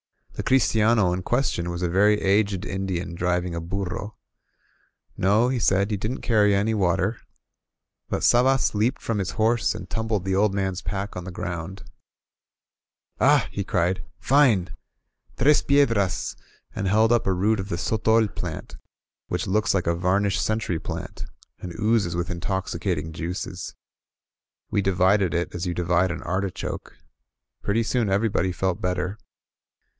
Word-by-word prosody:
The - - -4
christiano 110 -6 +3
in 90 - -2
ques 120 +8 +1
tion 85 0 -3
was 85 +1 -4
a - - +2
very 105 +4 +3
aged 100 -1 +1
Indian 95 -2 -3
driving 90 0 -1
a 85 - -3
burro. 100 +4 -4 1.0
No, 105 +6 +3
he 130 -1 0
said, 100 0 +2
he 105 - 0
didn't 110 +7 -4
carry 105 -3 +3
any 105 +3 +1
water. 95 +2 +1 0.9
But - - -2
Sabas 130 +2 +4
leaped 110 +6 +1
from 115 -3 -1
his 95 0 -2
horse 110 +4 +1
and - - -7
tumbled 110 -4 -2
the 95 - 0
old 100 +1 +2
man's 95 -2 -1
pack 100 0 -4
on 90 -1 -6
the 95 - -6
ground. 85 +2 -5 1.4
"Ah!" - - +4
he 100 - -3
cried; 90 -2 0
"fine! 120 -10 +3 0.6
Tres 150 +4 +4
piedrcu!*^ 115 -9 +1 0.4
and 100 -2 -2
held 110 +3 +3
up 120 -3 +2
a 95 - +3
root 105 +4 +1
of 95 +1 -5
the 85 - -2
sotol 110 +3 +2
plant, - - -6 0.5
which - - -2
looks 105 +2 +1
like 90 - 0
a 85 - +2
varnished 95 +3 +1
century 110 -6 -1
plant, - - -6 0.3
and 90 +2 -8
oozes 105 -5 +1
with 85 +1 -2
intoxicating 85 -2 -3
juices. 90 +2 -5 1.0
We 105 -2 +2
divided 95 -1 +2
it 85 +1 -1
as 90 +1 -3
you 85 - -2
divide 90 +1 +2
an 85 - -5
artichoke. 95 +2 -4 0.6
Pretty 110 +3 +1
soon 115 -2 0
everybody 100 -1 +1
felt 95 +2 -2
better. 90 +2 -2
95 Hz, 150 wpm, -24 LUFS, 90-110 Hz, 1.4 s, Sabas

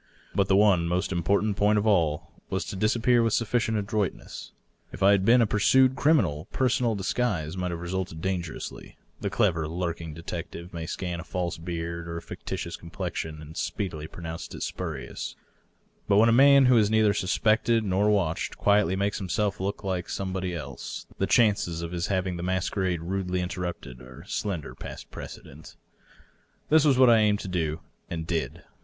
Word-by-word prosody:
But 95 +1 +2
the 95 - +4
one 95 -4 +4
most 90 +3 -1
important 100 +4 +1
point 105 +1 +3
of 105 - +1
all 85 -8 +1 0.2
was - - -2
to - - -6
dis 105 +4 +1
appear 120 +1 +3
with 115 -2 +1
sufiicient 115 -1 0
adroitness. 105 -2 -3 0.4
If 95 - -5
I 100 - +7
had 100 -2 +3
been 120 +4 +6
a - - +3
pursued 130 +5 +4
criminal, 125 - +2
personal 125 -3 +1
disguise 95 -5 -1
might 90 -1 -2
have 85 -1 -4
resulted 90 -2 -3
dangerously; 90 -2 -5 0.2
the - - -2
clever 80 -2 +1
lurking 85 -1 -4
detective 85 +1 -7
may 80 -1 -5
scan 90 0 -4
a - - -6
&lse 85 -2 -4
beard 85 -1 -4
or 85 0 -4
a - - -5
fictitious 85 - -5
complexion 85 -3 -5
and 80 +1 -11
speedily 80 -7 -3
pronounce 80 0 -7
it - - -5
spurious; - - -5 0.7
but 100 - +4
when 115 +2 +6
a - - +4
man 140 +2 +7
who 125 -1 +5
is 105 -1 +3
neither 110 -1 +4
suspected 110 +4 +2
nor 100 +1 +2
watched 90 -6 0
quietly 100 -3 +3
makes 100 +1 -1
himself 100 +2 -1
look 100 +3 -3
like 95 -2 -2
somebody 95 -2 -3
else, 70 -6 -7
the - - +1
chances 100 -7 +2
of 85 - -5
his 85 -1 -2
having 95 -2 -1
the - - -5
masquerade 95 -1 -1
rudely 90 0 -2
interrupted 90 -8 -5
are 65 +1 -12
slender 95 -7 -3
past - - -9
prece - - -8
dent. 75 +3 -13 0.9
This 155 0 +5
was 140 -4 +4
what 130 -2 +7
I 115 - +6
aimed 105 -1 +2
to - - -6
do, 80 -3 -2 0.3
and 80 -1 -4
did. 80 -2 -3
95 Hz, 180 wpm, -27 LUFS, 85-105 Hz, 0.9 s, I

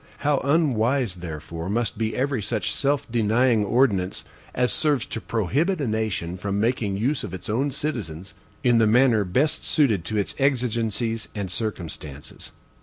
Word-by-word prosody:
How 145 -1 +3
unwise, 135 - +2
therefore, 85 0 -6
must 115 +3 0
be 110 0 -2
every 135 -2 0
such 105 -1 -1
self 140 0 0
denying 115 0 +3
ordinance 100 -5 +1 0.3
as 125 -2 +2
serves 145 -6 +1
to 115 - -5
prohibit 140 - 0
a 140 - -1
nation 110 -6 -2
from 100 +2 -2
making 110 -3 0
use 130 +7 0
of 95 - -5
its 90 - -9
own 135 +6 +1
citizens 100 - -4 0.3
in 120 -2 +4
the 110 - +4
manner 115 -1 +4
best 130 - +1
suited 115 - +2
to 110 +3 -2
its 100 - -1
exigencies 115 -4 0
and 100 -3 -3
circumstances! 80 -9 -6
115 Hz, 155 wpm, -24 LUFS, 100-130 Hz, 0.3 s, in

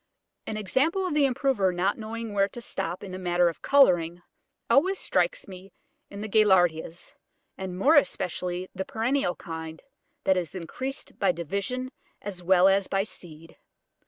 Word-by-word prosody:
An 215 - -3
example 275 - +1
of 360 - -2
the 295 -2 +4
improver 250 -7 +1
not 180 +3 0
knowing 225 0 -6
where 195 -1 +3
to 240 - -9
stop 180 -6 -4
in 195 - -7
the 185 - -6
matter 175 -1 +2
of 165 - -9
colouring, 175 -11 +3 0.4
always 370 +8 +3
strikes - - 0
me 190 0 -11 0.4
in 200 0 -8
the 215 - -4
Gaillardias, 180 -6 +2 0.4
and 190 -1 -6
more 275 +11 +4
especially 180 - 0
in 185 - -13
the 190 - -3
perennial 230 -3 0
kind, 160 -1 -8 0.4
that 190 -1 +3
is 180 0 -3
increased 260 - -5
by - - +3
division 250 - -3 0.3
as 190 -3 -7
well 185 +1 +5
as 195 0 +3
by 195 0 +1
seed. 165 -5 -9
195 Hz, 160 wpm, -27 LUFS, 175-235 Hz, 0.4 s, well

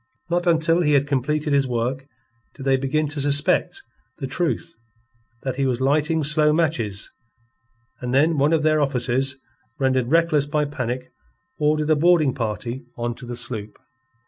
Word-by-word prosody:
Not 175 +1 0
until 165 +1 +3
he 150 -3 +2
had 140 -1 +3
completed 145 +2 -1
his 140 -1 +3
work 125 +3 -2 0.5
did 135 - -9
they 135 0 +3
begin 140 +3 0
to 145 -1 -3
suspect 145 - +2 0.3
the 140 - -4
truth 165 +4 -2 0.7
that 130 -1 -3
he 135 -1 +1
was 125 -2 -1
lighting 150 +4 +1
slow 150 +1 +4
matches 125 -11 -1 0.9
and 125 -1 -4
then 150 +4 +3
one 145 +3 +3
of 160 -2 +2
their 155 -1 +3
officers 130 -1 0 0.4
rendered 130 -2 +1
reckless 155 -2 +2
by 150 0 0
panic 130 -3 -4 0.5
ordered 150 +1 +1
a - - +5
boarding 160 -3 +3
party 120 +1 -4
on 120 0 -2
to 125 +1 -11
the 120 - -5
shop. 115 -4 -6
140 Hz, 160 wpm, -22 LUFS, 130-155 Hz, 0.9 s, a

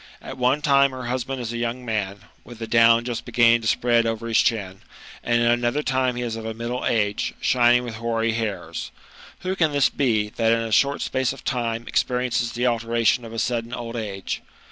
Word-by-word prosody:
At - - -8
one 130 +4 +2
time 140 -2 +4
her 130 -1 -6
husband 130 +1 -3
is 120 -1 -4
a 120 - -4
young 120 +2 -3
man, 100 -3 -3 0.2
with 120 +1 -12
the 115 - -5
down 115 +1 +4
just 120 -2 -3
beginning 120 -1 +4
to 110 - -3
spread 120 0 +2
over 115 0 -3
his 115 - +3
chin, 100 -5 0 0.4
and 120 0 +2
at 120 - +4
another 120 +5 0
time 130 -2 0
he 125 - -3
is 115 -2 -3
of 115 - -6
a 110 0 -5
middle 120 +2 -4
age,.shining 120 +3 +2
with 115 -3 -6
hoary 115 0 0
hairs. 110 -3 -4 0.5
Who 185 +1 -2
can 160 -5 +1
this 140 -4 +3
be, 110 -6 +1
that 115 +1 +1
in 115 - +1
a 115 -1 -4
short 140 +6 +2
space 130 -1 -1
of 135 - -13
thne 120 -2 -2
experiences 125 -1 0
the 120 +1 -1
alteration 115 0 +1
of 115 - -9
a 115 - -7
sudden 120 +1 -2
old 115 0 -6
age 100 -4 -4
120 Hz, 210 wpm, -23 LUFS, 115-125 Hz, 0.5 s, time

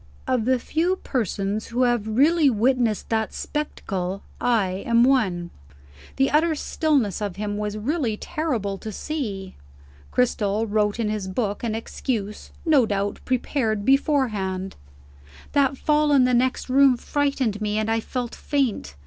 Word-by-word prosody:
Of 255 -4 0
the 260 +1 +3
few 330 +9 0
persons 215 - -2
who 245 +2 0
have 240 -3 +1
really 290 +7 +4
witnessed 235 -1 +1
that 220 -1 0
spectacle, 195 -10 -3 0.2
I 195 -6 +1
am 235 0 +4
one. 195 -10 +2 0.6
The 270 0 +2
utter 315 +2 +3
stillness 285 - 0
of 200 -3 -3
him 205 0 -3
was 210 0 -3
really 240 -1 -1
terrible 240 - -2
to 220 - -6
see. 205 -8 -4 0.6
Cristel 220 -3 +1
wrote 210 0 0
in 220 -2 0
his 210 -3 -3
book 205 +2 -2
an 225 -2 -1
excuse, 220 -2 -4 0.2
no 290 -8 +4
doubt 200 0 -1
prepared 230 -4 -1
beforehand: 215 -9 +1 0.8
"That 275 -1 +2
fall 300 0 +2
in 270 -2 +6
the 250 0 +2
next 255 +1 +1
room 265 -1 +5
frightened 270 -7 -1
me, 210 0 -1
and 215 0 0
I 225 0 +1
felt 245 +1 -4
faint. 245 - -1
230 Hz, 145 wpm, -24 LUFS, 205-270 Hz, 0.8 s, in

